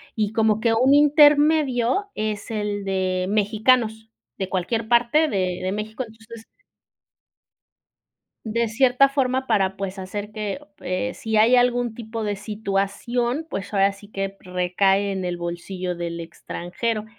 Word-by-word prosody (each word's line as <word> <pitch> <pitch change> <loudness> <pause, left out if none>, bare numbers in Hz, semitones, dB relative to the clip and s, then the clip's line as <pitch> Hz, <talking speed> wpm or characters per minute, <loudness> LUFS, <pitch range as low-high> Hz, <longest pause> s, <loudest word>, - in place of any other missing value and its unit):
Y 215 -1 -1
como 220 -2 +2
que 230 0 +2
un 255 +4 +4
intermedio 295 - +4
es 215 0 -3
el 210 -2 -2
de 185 -1 -1
mexicanos 220 +2 +1 0.3
de 190 -1 -3
cualquier 220 +5 -2
parte 240 +7 +3
de 185 -5 -1
de 185 - -1
México, 215 +4 -4
entonces 225 0 -13 2.0
de 230 +1 0
cierta 250 +4 +4
forma 265 -1 0
para, 195 -1 +1
pues, 195 0 -4
hacer 205 +2 -6
que 210 +3 -4 0.2
eh, 185 +8 -2
si 220 -1 -2
hay 225 +4 +6
algún 245 -1 +2
tipo 225 -1 -6
de 205 -1 -1
situación, 220 +7 -2
pues, 195 -4 -5
ahora 195 0 +3
sí 200 +1 -15
que 195 -1 -4
recae 190 +2 +1
en 190 -1 -3
el 175 -1 -3
bolsillo 175 +1 -4
del 170 0 -5
extranjero. 195 +6 -4
215 Hz, 140 wpm, -23 LUFS, 195-240 Hz, 2.0 s, hay